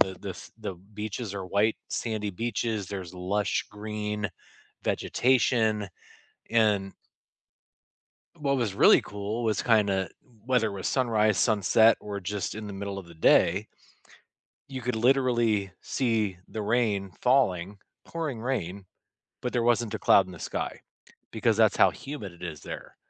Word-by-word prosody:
the 95 0 +3
the - - -6
f - - -10
the 95 - -5
beaches 105 +3 -6
are 95 -2 -4
white, 105 +4 +2
sandy 110 -3 -2
beaches. 110 0 -2
There's 95 -2 -6
lush 100 +3 -1
green 105 -1 -4 0.5
vegetation, 115 -4 +2 0.6
and 105 -4 +2 1.5
what 140 -2 +1
was 110 -6 -1
really - - +6
cool 105 +3 -4
was 110 -3 +1
kinda, 100 -5 +2 0.4
whether 125 -4 +2
it - - -6
was 95 -2 -4
sunrise, 110 -5 +2
sunset, 110 +1 +4
or 100 -1 -5
just 100 +1 -3
in 105 -1 -6
the - - -6
middle 100 0 -5
of 95 -3 -7
the 85 - -14
day 90 +5 +4 1.0
you 130 -2 -6
could 125 0 -1
literally 120 -5 +2
see 110 -7 0
the 110 - -6
rain 105 -3 0
falling, 100 -7 +2 0.3
pouring 150 -9 -4
rain, 100 -7 -3 0.6
but 125 - -3
there 120 - +1
wasn't 120 -2 +2
a - - -2
cloud 95 -2 +5
in 95 - -10
the - - -10
sky - - -4 0.5
because - - +1
that's - - +4
how - - +6
humid 125 -10 -7
it 85 - -16
is 80 -5 -6
there. - - -8
105 Hz, 150 wpm, -27 LUFS, 100-115 Hz, 1.5 s, really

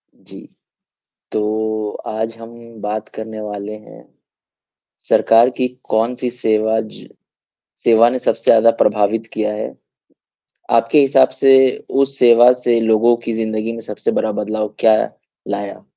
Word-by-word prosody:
जी। - - -14 0.9
तो 110 0 -2 0.2
आज 110 +1 -4
हम 115 +1 -12 0.3
बात 105 +1 -4
करने 110 0 -7
वाले 105 0 -6
हैं, 110 0 -13 1.1
सरकार 115 +2 +4
की 125 - 0 0.2
कौन-सी 120 +3 -1
सेवा 110 -2 0
ज 110 - -12 0.8
सेवा 115 0 +5
ने 130 - -2
सबसे - - -2
ज़्यादा 115 0 +5
प्रभावित 105 +2 0
किया 105 -1 -2
है। 105 - -6 1.0
आपके 115 +6 +3
हिसाब 135 -1 +4
से 135 -1 +5 0.5
उस 140 0 0
सेवा 120 0 +6
से 120 -1 +2
लोगों 115 +1 +3
की 115 - -3
जिंदगी 110 0 -3
में 115 - -8
सबसे 105 -2 -4
बड़ा 110 - -1
बदलाव 105 0 -4
क्या 110 -1 +4 0.5
लाया? 100 0 -5
110 Hz, 130 wpm, -17 LUFS, 110-115 Hz, 1.1 s, सेवा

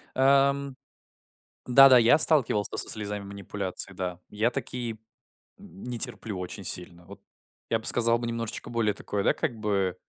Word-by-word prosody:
Эм. 140 0 +2 0.9
Да-да, 130 0 +7
я 120 +5 +5
сталкивался 135 -10 +3
со - - -1
слезами 105 -1 -4
манипуляции, 100 -1 -7
да, 90 -1 -6
я 110 +3 -1
такие 120 -2 -5 0.6
не 120 +5 -8
терплю 110 -5 0
очень 90 +2 -7
сильно. 85 -1 -1
Вот 100 +2 -14 0.5
я 115 - +1
бы - - -12
сказал 115 -1 +5
бы 120 - -6
немножечко 115 -1 -5
более 110 -3 0
такое, 100 -1 -4
да, - - +2
как 140 -8 -4
бы 100 -4 -2
110 Hz, 150 wpm, -26 LUFS, 100-125 Hz, 0.9 s, Да-да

